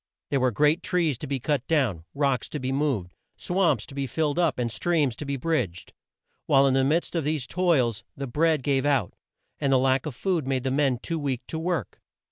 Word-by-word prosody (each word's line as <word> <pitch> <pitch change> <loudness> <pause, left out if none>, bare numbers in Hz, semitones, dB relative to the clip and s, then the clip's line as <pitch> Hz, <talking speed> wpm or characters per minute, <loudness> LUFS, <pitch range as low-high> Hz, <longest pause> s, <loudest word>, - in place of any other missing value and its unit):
There 140 - +2
were 130 0 +3
great 150 +8 +2
trees 170 -6 +1
to - - -6
be 135 0 -2
cut 135 0 -1
down, 120 - +1
rocks 140 -3 0
to 150 - -4
be 130 0 -2
moved, 135 -11 -1 0.2
swamps 175 - +1
to - - -13
be 140 -1 -2
filled 150 +4 -1
up, 165 -6 +2
and 120 -2 -1
streams 150 -1 +1
to 150 - -6
be 140 0 -2
bridged. 125 - -2 0.5
While 135 0 +5
in 135 - +3
the 135 0 +3
midst 155 +6 +1
of 165 -3 0
these 150 -2 -1
toils, 130 - +1
the 140 - -3
bread 150 +2 +1
gave 135 -1 +1
out, 140 -9 +1 0.5
and 140 - +1
the 135 - +5
lack 130 +2 +2
of 140 - -6
food 170 -3 -1
made 130 -2 0
the 130 - -1
men 135 -2 +2
too 165 +6 -4
weak 130 -4 -3
to 160 - -3
work. 165 - -3
140 Hz, 220 wpm, -26 LUFS, 130-155 Hz, 0.5 s, While